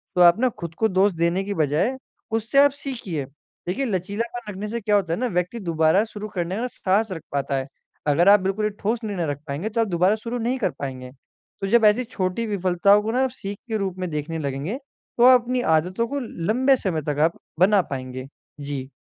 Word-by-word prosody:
तो 180 Hz, -, +3 dB
आप 175 Hz, +3 st, +7 dB
ना 255 Hz, +1 st, +3 dB
खुद 170 Hz, -3 st, -6 dB
को 220 Hz, -, +2 dB
दोष 190 Hz, +2 st, +3 dB
देने 170 Hz, +3 st, +1 dB
की 200 Hz, +1 st, -3 dB
बजाय 160 Hz, -, +1 dB, 0.4 s
उससे 225 Hz, +4 st, -2 dB
आप 285 Hz, 0 st, +6 dB
सीखिए। 235 Hz, -, -5 dB, 0.4 s
देखिए 230 Hz, +10 st, -1 dB
लचीलापन 210 Hz, +3 st, -3 dB
रखने 205 Hz, +2 st, -5 dB
से 235 Hz, +2 st, -3 dB
क्या 210 Hz, 0 st, +2 dB
होता 185 Hz, -5 st, +1 dB
है -, -, -2 dB
ना 250 Hz, -, 0 dB
व्यक्ति 180 Hz, +6 st, -1 dB
दोबारा 165 Hz, 0 st, +2 dB
शुरू 215 Hz, -1 st, -7 dB
करने 175 Hz, +1 st, -2 dB
का 220 Hz, -, -3 dB
ना, 250 Hz, -, -1 dB
साहस 210 Hz, -2 st, 0 dB
रख 165 Hz, -3 st, -5 dB
पाता 140 Hz, -1 st, -1 dB
है। 135 Hz, 0 st, -3 dB, 0.4 s
अगर 165 Hz, +6 st, +4 dB
आप 205 Hz, +1 st, +8 dB
बिल्कुल 195 Hz, +3 st, -1 dB
ही -, -, +2 dB
ठोस 225 Hz, +3 st, -1 dB
निर्णय 200 Hz, -6 st, -2 dB
रख 145 Hz, -1 st, -3 dB
पाएँगे, 150 Hz, +9 st, -3 dB
तो 230 Hz, +1 st, 0 dB
आप 225 Hz, -, +1 dB
दोबारा 185 Hz, +2 st, +2 dB
शुरू 230 Hz, +2 st, -5 dB
नहीं 240 Hz, +2 st, -1 dB
कर 250 Hz, -, 0 dB
पाएँगे। 130 Hz, -2 st, -6 dB, 0.5 s
तो 195 Hz, -, -1 dB
जब 225 Hz, +2 st, +4 dB
ऐसी 210 Hz, +4 st, +4 dB
छोटी 210 Hz, -2 st, -2 dB
विफलताओं 200 Hz, 0 st, +3 dB
को 220 Hz, -, -1 dB
ना 250 Hz, +3 st, +1 dB
जब 265 Hz, -, +1 dB
सीख 200 Hz, -2 st, -6 dB
के 220 Hz, -2 st, -1 dB
रूप 190 Hz, -3 st, -3 dB
में 180 Hz, -1 st, -2 dB
देखने 155 Hz, +1 st, -3 dB
लगेंगे, 140 Hz, -, -3 dB, 0.4 s
तो 240 Hz, -, +4 dB
आप 255 Hz, -1 st, +8 dB
अपनी 250 Hz, +1 st, -1 dB
आदतों 185 Hz, +8 st, 0 dB
को 285 Hz, +3 st, -3 dB
ल 250 Hz, -, -5 dB, 0.2 s
लंबे 260 Hz, +4 st, +4 dB
समय 175 Hz, -9 st, -2 dB
तक 145 Hz, -1 st, -1 dB
आप 160 Hz, +2 st, +2 dB, 0.2 s
बना 195 Hz, +2 st, +5 dB
पाएँगे। 130 Hz, -1 st, -5 dB, 0.3 s
जी। 140 Hz, -2 st, -5 dB
195 Hz, 225 wpm, -23 LUFS, 165-225 Hz, 0.5 s, आप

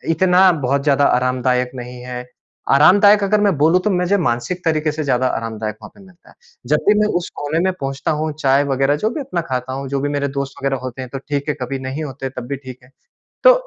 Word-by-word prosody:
इतना 185 Hz, +2 st, +5 dB, 0.2 s
बहुत 140 Hz, +1 st, +1 dB
ज़्यादा 145 Hz, -1 st, +3 dB
आरामदायक 125 Hz, 0 st, +1 dB
नहीं 125 Hz, 0 st, -8 dB
है। 125 Hz, 0 st, -6 dB, 0.5 s
आरामदायक 200 Hz, +8 st, +6 dB
अगर 205 Hz, +1 st, +2 dB
मैं 200 Hz, -3 st, +2 dB
बोलूँ 160 Hz, +5 st, +4 dB
तो 210 Hz, -, +1 dB
मझे 180 Hz, +1 st, +1 dB
मानसिक 135 Hz, +3 st, -2 dB
तरीके 155 Hz, -1 st, +1 dB
से 155 Hz, +1 st, -4 dB
ज़्यादा 130 Hz, -2 st, +1 dB
आरामदायक 110 Hz, -3 st, -3 dB
वहाँ -, -, -10 dB
पे -, -, -18 dB
मिलता 180 Hz, -2 st, -21 dB
है। -, -, -19 dB, 0.3 s
जब 150 Hz, -, +4 dB
भी 210 Hz, -, +7 dB
मैं 210 Hz, -, +3 dB
उस 175 Hz, -, -4 dB
कोने 145 Hz, +3 st, -2 dB
में 185 Hz, +2 st, +2 dB
पहुँचता 135 Hz, +2 st, -2 dB
हूँ, 155 Hz, 0 st, -1 dB
चाय 140 Hz, -1 st, +3 dB
वगैरह 135 Hz, 0 st, +1 dB
जो 215 Hz, -, +3 dB
भी 245 Hz, -, -5 dB
अपना 255 Hz, -11 st, -3 dB
खाता 130 Hz, 0 st, -3 dB
हूँ, 135 Hz, 0 st, -5 dB
जो 140 Hz, 0 st, -1 dB
भी 145 Hz, -, -1 dB
मेरे 145 Hz, -1 st, -1 dB
दोस्त 135 Hz, 0 st, -3 dB
वगैरह 135 Hz, 0 st, 0 dB
होते 130 Hz, 0 st, -6 dB
हैं 130 Hz, -, -7 dB
तो -, -, -2 dB
ठीक 145 Hz, 0 st, -2 dB
है -, -, +1 dB
कभी 135 Hz, +2 st, -3 dB
नहीं 130 Hz, +4 st, -5 dB
होते 135 Hz, -2 st, -5 dB
तब 125 Hz, -2 st, -8 dB
भी 140 Hz, -, -3 dB
ठीक 130 Hz, -2 st, -11 dB
है। 125 Hz, -, -20 dB, 0.5 s
तो -, -, +9 dB
140 Hz, 235 wpm, -19 LUFS, 130-170 Hz, 0.5 s, तो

